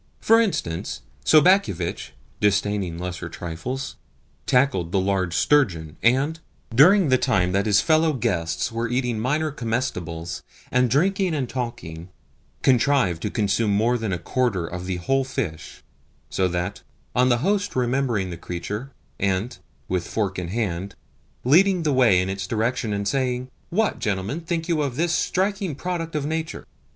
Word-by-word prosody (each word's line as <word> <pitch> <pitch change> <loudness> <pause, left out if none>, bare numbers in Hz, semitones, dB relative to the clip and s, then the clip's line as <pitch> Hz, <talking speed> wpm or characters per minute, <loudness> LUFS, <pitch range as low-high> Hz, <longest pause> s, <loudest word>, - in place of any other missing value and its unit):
For 225 +1 +5
instance, 85 - -2 0.2
Sobakevitch, 155 - +3 0.3
disdaining 100 -3 +1
lesser 90 -1 -5
trifles, 90 +13 -5 0.5
tackled 125 -10 +2
the 95 - +2
large 95 -2 0
sturgeon, 85 - +2
and, 135 +7 +2 0.3
during 175 - +6
the 130 -1 +4
time 95 -10 +2
that 100 +3 +1
his 100 -1 +4
fellow 160 0 +3
guests 90 - -1
were 115 0 -2
eating 125 -2 -1
minor 150 +6 0
comestibles, 100 - -3 0.3
and 125 0 +3
drinking 185 - +2
and 135 -4 -1
talking, 90 -10 -5 0.5
contrived 125 -9 +3
to 105 - -2
consume 105 +1 +1
more 115 +4 +2
than 110 -4 -2
a 90 - 0
quarter 100 0 -1
of 90 +2 -6
the 95 - -1
whole 135 +10 +1
fish; 100 -11 -5 0.5
so 95 - +1
that, 90 +2 -3 0.3
on 125 +1 +4
the 120 - +4
host 205 0 0
remembering 120 -6 0
the 85 - -6
creature, 100 +9 -5 0.3
and, 100 +4 -1 0.3
with 90 -2 -2
fork 100 -4 -2
in 90 - -4
hand, 100 -2 -3 0.5
leading 180 +6 +4
the 150 -2 +1
way 120 -8 +5
in 90 - 0
its 95 -1 -3
direction 115 +1 -1
and 100 0 -2
saying, 125 +1 -1 0.2
"What, 215 +4 0
gentlemen, 105 - -2
think 165 0 -3
you 165 -3 +1
of 140 -4 -2
this 170 +4 +1
striking 190 -2 0
product 165 0 -4
of 145 -2 -1
nature?" 160 +1 -3
120 Hz, 150 wpm, -23 LUFS, 95-145 Hz, 0.5 s, during